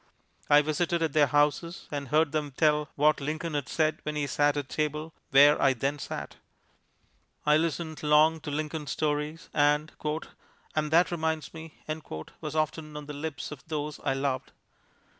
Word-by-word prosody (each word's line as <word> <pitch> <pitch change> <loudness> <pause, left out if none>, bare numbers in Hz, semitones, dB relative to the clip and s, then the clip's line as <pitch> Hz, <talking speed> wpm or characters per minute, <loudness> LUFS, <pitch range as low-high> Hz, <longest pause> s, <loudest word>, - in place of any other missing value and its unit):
I 150 0 +7
visited 165 +2 0
at 160 -3 -1
their 150 -2 +5
houses 150 +4 +1
and 140 -1 -3
heard 155 +2 +3
them 150 -3 -2
tell 150 -2 +3
what 150 +1 +3
Lincoln 155 +3 -3
had 145 -4 -2
said 155 -1 +1
when 150 0 -4
he 150 -1 0
sat 145 +1 +2
at 145 -2 -2
table 155 +2 -2 0.2
where 145 +2 +6
I 135 - +5
then 135 +4 -2
sat. - - -6 1.1
I 150 0 +5
listened 160 0 -1
long 155 +2 +4
to 155 -1 -7
Lincoln 150 0 -3
stories, 150 +3 -2
and 150 +1 +2 0.8
"and 155 -1 0
that 170 +3 +4
reminds 160 -2 -2
me" 160 -1 -10 0.7
was 155 -1 -5
often 155 0 -2
on 150 - -7
the 150 - -7
lips 155 +2 -5
of 145 -3 -9
those 150 -2 -3
I 135 - +1
loved. 135 -1 -2
150 Hz, 165 wpm, -28 LUFS, 145-155 Hz, 1.1 s, I